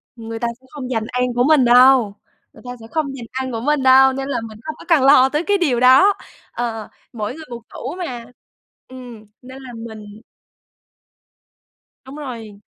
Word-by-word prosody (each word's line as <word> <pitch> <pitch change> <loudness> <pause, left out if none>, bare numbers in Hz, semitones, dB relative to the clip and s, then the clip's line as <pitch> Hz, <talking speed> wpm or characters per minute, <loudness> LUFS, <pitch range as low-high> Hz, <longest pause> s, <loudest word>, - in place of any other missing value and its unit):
Người 225 -1 -7
ta 235 - -1
sẽ - - -24
không 270 -4 -7
giành 225 -3 -1
ăn 250 0 -1
của 245 - +2
mình 290 -2 +4
đâu, 245 -3 +5 0.4
người - - -17
ta 245 - -6
sẽ 225 - -12
không 315 -2 -1
giành 245 -3 -8
ăn 260 0 -4
của 230 - -4
mình 295 +2 0
đâu, 265 0 +6
nên 270 +1 -5
là 280 - -2
mình 215 -1 -13
không 310 -1 -6
có - - -13
cần 325 -6 +3
lo 265 -1 +6
tới 300 +4 -1
cái 405 +2 +1
điều 285 -10 0
đó. 260 +11 +6 0.4
Ờ, 225 -3 -5 0.2
mỗi 210 -2 -4
người 320 0 -11
một 235 -1 -8
tủ - - -7
mà, 250 -10 -6 0.6
ừm, 245 -4 -12 0.2
nên 260 +2 -12
là 250 - -10
mình 220 -2 -10 1.8
Đúng 265 +2 -12
rồi. 230 -8 -9
255 Hz, 195 wpm, -19 LUFS, 230-270 Hz, 1.8 s, đâu